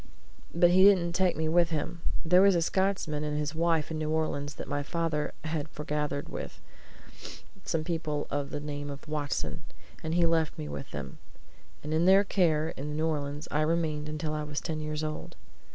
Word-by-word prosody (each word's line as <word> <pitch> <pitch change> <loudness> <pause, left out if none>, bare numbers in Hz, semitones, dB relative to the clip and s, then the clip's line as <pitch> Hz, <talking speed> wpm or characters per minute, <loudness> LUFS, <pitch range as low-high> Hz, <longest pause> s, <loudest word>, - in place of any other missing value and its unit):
But 175 +1 +5
he 185 +1 +6
didn't 180 -4 +5
take 185 -2 +2
me 160 0 0
with 170 +1 +4
him. 165 +1 -3 0.2
There 180 +3 +6
was 195 -1 +6
a 170 - +3
Scotsman 185 -5 0
and 150 0 -2
his 150 +1 -1
wife 165 -1 +1
in 155 - -2
New 155 -1 -1
Orleans 155 -2 -1
that - - -7
my 145 -1 -1
father 155 0 -1
had 155 -1 -3
forgathered 150 -1 -2
with - - -7 1.1
some 160 -1 0
people 155 -3 -2
of 145 -1 -1
the - - -4
name 145 -1 -5
of 140 +2 -8
Watson, 150 +1 -2 0.4
and 160 +1 -1
he 175 -1 +4
left 165 -2 +1
me 75 - -4
with 75 -1 -6
them, - - -7 0.6
and 150 +1 -3
in 160 +2 +3
their 195 +2 +7
care 160 -6 +2
in 150 +2 -5
New 160 - +1
Orleans 145 -1 -2
I 150 - +2
remained 155 -2 0
till 155 0 -2
I 155 - -1
was 150 0 -3
ten 160 -2 -3
years 150 0 -3
old. 155 0 -5
155 Hz, 195 wpm, -29 LUFS, 150-170 Hz, 1.1 s, their